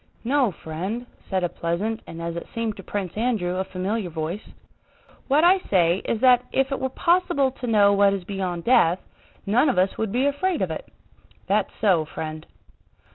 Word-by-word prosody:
"No, 260 0 +2
friend," 185 +9 -5 0.2
said 190 -2 0
a - - +2
pleasant 190 +9 -2
and, 165 - -8
as 170 0 -3
it 170 - -6
seemed 230 -2 -2
to - - -7
Prince 190 -2 -4
Andrew, 210 -6 0
a 190 - 0
familiar 190 +2 -3
voice, 160 +5 -4 0.9
"what 290 +3 +3
I 370 +2 +6
say 175 - +2
is 225 - -1
that 250 -1 +6
if 270 +1 +1
it 275 - -1
were 265 - -1
possible 285 -3 +2
to 250 -1 -7
know 205 -3 +5
what 200 0 +4
is 190 - -5
beyond 180 -3 -3
death, 180 -8 +4 0.5
none 240 +9 +3
of 255 - 0
us 185 +1 +1
would 220 -2 -1
be 250 +5 +1
afraid 330 +5 0
of - - -2
it. - - -6 0.6
That's 200 +1 +1
so, 185 -7 +3
friend." 155 0 -6
205 Hz, 185 wpm, -24 LUFS, 180-250 Hz, 0.9 s, I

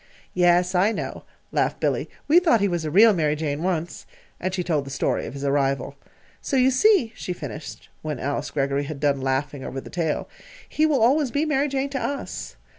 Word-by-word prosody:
"Yes, 180 0 +3
I 190 +4 +3
know," - - -5 0.3
laughed - - 0
Billy. - - -1 0.2
"We 320 +4 +7
thought 325 -11 +3
he 200 - +2
was 175 -3 -2
a - - -1
real 210 +7 +6
Mary 155 -4 +1
Jane, 150 -1 -3
once." 170 -2 -3 0.3
And 185 - -2
she 185 -1 -2
told 160 -5 0
the 135 - -9
story 135 - -1
of - - -8
his 140 - -6
arrival. 140 -1 0 0.5
"So 275 - -1
you 260 +1 +4
see," 265 - +3
she 180 - -4
finished, 150 -4 -8
when 155 -3 -4
Alice 140 +1 -2
Greggory 140 0 -1
had 145 -1 -6
done 140 -2 +1
laughing 135 +1 -2
over 135 - -5
the - - -11
tale, 165 -4 -1 0.4
"he 305 - -1
always 275 0 +3
will - - -15
be 290 +2 +1
'Mary 295 -2 +1
Jane' 275 0 -1
to 270 - -2
us. 280 -1 -4
175 Hz, 205 wpm, -24 LUFS, -, 0.5 s, We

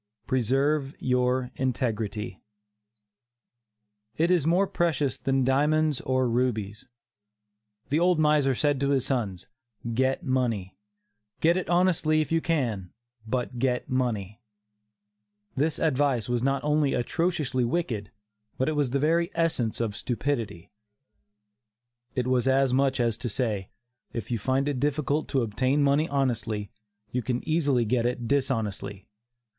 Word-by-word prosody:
PRESERVE 135 +4 +1
YOUR 125 0 +1
INTEGRITY. 110 -5 -2 1.8
It 170 +3 +2
is 170 -5 +2
more 180 +4 +4
precious 155 -8 0
than 135 -1 +1
diamonds 150 +2 +2
or 130 -1 +1
rubies. 115 -4 -1 1.0
The 150 - +2
old 175 0 +3
miser 150 -3 +3
said 145 +1 +1
to 140 0 +1
his 135 -3 +1
sons: 100 -9 -2 0.5
"Get 130 +3 +1
money; 120 -8 -1 0.6
get 170 +2 +4
it 185 -2 -2
honestly, 175 -3 +3
if 155 - -1
you 165 0 +2
can, 120 - -1 0.4
but 125 0 -2
get 125 -1 0
money." 115 -5 -1 1.1
This 150 +3 0
advice 135 -6 +1
was 120 -1 0
not 135 +2 0
only 150 -1 +2
atrociously 150 0 0
wicked, 120 - -1 0.5
but 130 - 0
it 155 - 0
was 145 -3 +1
the 135 - 0
very 165 +4 +2
essence 160 -9 0
of 110 -3 -1
stupidity. 115 -7 -3 1.4
It 125 - 0
was 130 0 +1
as 135 -1 +3
much 135 0 +2
as 115 -2 0
to 125 - -2
say, 105 -4 -2 0.4
"if 115 0 -5
you 115 - 0
find 130 +6 0
it 140 -3 -1
difficult 145 +1 0
to 135 -4 +1
obtain 130 +6 +1
money 145 +3 +2
honestly, 115 -7 -1 0.4
you 125 - -1
can 125 +3 -3
easily 145 -7 +2
get 120 +2 +1
it 120 -1 -3
dishonestly. 110 -7 -2
130 Hz, 135 wpm, -27 LUFS, 120-150 Hz, 1.8 s, more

